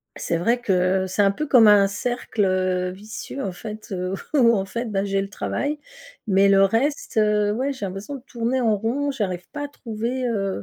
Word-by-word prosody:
c'est 170 Hz, -, -2 dB
vrai 235 Hz, +8 st, +1 dB
que, 190 Hz, -3 st, +1 dB
c'est 185 Hz, +3 st, 0 dB
un 200 Hz, -, +5 dB
peu 305 Hz, +10 st, -3 dB
comme 240 Hz, -5 st, +7 dB
un 205 Hz, -1 st, +7 dB
cercle, 225 Hz, +1 st, -2 dB
heu, 185 Hz, -1 st, 0 dB
vicieux 215 Hz, +7 st, -7 dB
en 195 Hz, -, -2 dB
fait, 215 Hz, +4 st, -9 dB
heu, 185 Hz, 0 st, -2 dB, 0.2 s
où 235 Hz, -5 st, +5 dB
en 195 Hz, -1 st, -1 dB
fait 235 Hz, +5 st, -4 dB
bah, 195 Hz, -1 st, 0 dB
j'ai 195 Hz, 0 st, 0 dB
le 195 Hz, -, -5 dB
travail. 285 Hz, +8 st, -2 dB, 0.5 s
Mais 195 Hz, 0 st, +4 dB
le 195 Hz, 0 st, +6 dB
reste, 250 Hz, +5 st, 0 dB
heu, 210 Hz, -1 st, +3 dB
ouais, 265 Hz, +5 st, -1 dB
j'ai 235 Hz, -7 st, -5 dB
l'impression 195 Hz, +9 st, -6 dB
de 255 Hz, -, -10 dB
tourner 240 Hz, +2 st, -1 dB
en 220 Hz, -3 st, +3 dB
rond, 270 Hz, +7 st, -1 dB
j'arrive 185 Hz, -9 st, -3 dB
pas 290 Hz, -1 st, -4 dB
à -, -, -5 dB
trouver, 240 Hz, 0 st, -4 dB
heu, 195 Hz, -, -2 dB
210 Hz, 210 wpm, -23 LUFS, 195-240 Hz, 0.5 s, comme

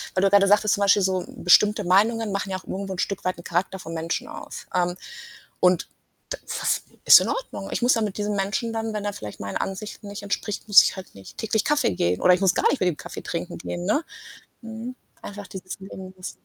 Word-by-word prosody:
weil 185 Hz, -, +2 dB
du 195 Hz, -, +5 dB
gerade 200 Hz, 0 st, +5 dB
sagtest 210 Hz, +1 st, +4 dB
zum 200 Hz, -, -5 dB
Beispiel 200 Hz, 0 st, +5 dB
so, 185 Hz, -1 st, 0 dB
bestimmte 210 Hz, +4 st, +4 dB
Meinungen 210 Hz, +4 st, +2 dB
machen 195 Hz, 0 st, -2 dB
ja 185 Hz, -, -1 dB
auch -, -, -12 dB
irgendwo 195 Hz, 0 st, -4 dB
'n 180 Hz, -, -7 dB
Stück 200 Hz, 0 st, -2 dB
weit 185 Hz, 0 st, -1 dB
'n 170 Hz, -, -11 dB
Charakter 180 Hz, +3 st, -1 dB
vom 165 Hz, -2 st, -8 dB
Menschen 165 Hz, +1 st, -3 dB
aus. -, -, -9 dB
Ähm, 180 Hz, -1 st, +1 dB, 0.7 s
und 180 Hz, -1 st, +3 dB, 0.4 s
da -, -, -3 dB
das -, -, -1 dB, 0.2 s
ist -, -, +10 dB
in -, -, -2 dB
Ordnung. -, -, -4 dB
Ich -, -, -2 dB
muss 245 Hz, +1 st, +5 dB
ja 225 Hz, -, 0 dB
mit 210 Hz, -3 st, -3 dB
diesem 210 Hz, 0 st, -1 dB
Menschen 210 Hz, +5 st, -1 dB
dann 225 Hz, -1 st, -3 dB
wenn 210 Hz, -, -3 dB
er 205 Hz, -, -1 dB
vielleicht 105 Hz, -, -9 dB
meinen 100 Hz, 0 st, -5 dB
Ansichten 205 Hz, +1 st, -5 dB
nicht 200 Hz, 0 st, -7 dB
entspricht, 205 Hz, +1 st, -3 dB
muss 205 Hz, -, +9 dB
ich -, -, -1 dB
halt 190 Hz, -, -10 dB
nicht 95 Hz, -1 st, -13 dB
täglich 220 Hz, 0 st, 0 dB
Kaffee 295 Hz, -, +2 dB
gehen 90 Hz, +1 st, 0 dB
oder 180 Hz, -, +6 dB
ich 180 Hz, -, -1 dB
muss 190 Hz, -3 st, +3 dB
gar -, -, +3 dB
nicht 285 Hz, -, -1 dB
mit 185 Hz, -, +3 dB
dem 170 Hz, -, -2 dB
Kaffee -, -, -8 dB
trinken 170 Hz, +1 st, -5 dB
gehen, 175 Hz, +1 st, -5 dB
ne? 215 Hz, -, +1 dB, 0.6 s
Mhm, 230 Hz, +2 st, -7 dB, 0.3 s
einfach 205 Hz, -1 st, -8 dB
dieses 185 Hz, 0 st, -8 dB
Leben 190 Hz, -1 st, -9 dB
lassen. 185 Hz, -, -6 dB
195 Hz, 235 wpm, -24 LUFS, 180-210 Hz, 0.7 s, ist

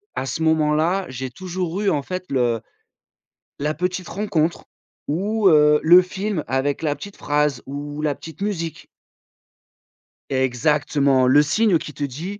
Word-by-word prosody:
à -, -, -2 dB
ce 160 Hz, -, -4 dB
moment 160 Hz, -1 st, +2 dB
là, 175 Hz, +5 st, +1 dB
j'ai 130 Hz, 0 st, -5 dB
toujours 180 Hz, +4 st, -4 dB
eu 200 Hz, -, +2 dB
en 145 Hz, -, 0 dB
fait 185 Hz, +5 st, -5 dB
le 120 Hz, -4 st, +1 dB, 1.0 s
la 150 Hz, +2 st, -1 dB
petite 180 Hz, +2 st, -2 dB
rencontre 175 Hz, -5 st, -1 dB, 0.4 s
ou, 200 Hz, +6 st, +1 dB
heu, 150 Hz, -2 st, +6 dB
le 175 Hz, +3 st, +8 dB
film 190 Hz, -2 st, -3 dB
avec 135 Hz, +3 st, -1 dB
la 150 Hz, -2 st, 0 dB
petite 200 Hz, +6 st, -10 dB
phrase, 145 Hz, -3 st, 0 dB
ou 145 Hz, +2 st, -6 dB
la 150 Hz, -2 st, 0 dB
petite 160 Hz, +5 st, -12 dB
musique. 165 Hz, -6 st, -4 dB, 1.4 s
Exactement! 135 Hz, +1 st, +2 dB
Le 140 Hz, +4 st, +6 dB
signe 175 Hz, +4 st, +2 dB
qui 150 Hz, -, -7 dB
te 145 Hz, -, -5 dB
dit: 165 Hz, +10 st, -5 dB
155 Hz, 150 wpm, -22 LUFS, 145-185 Hz, 1.4 s, le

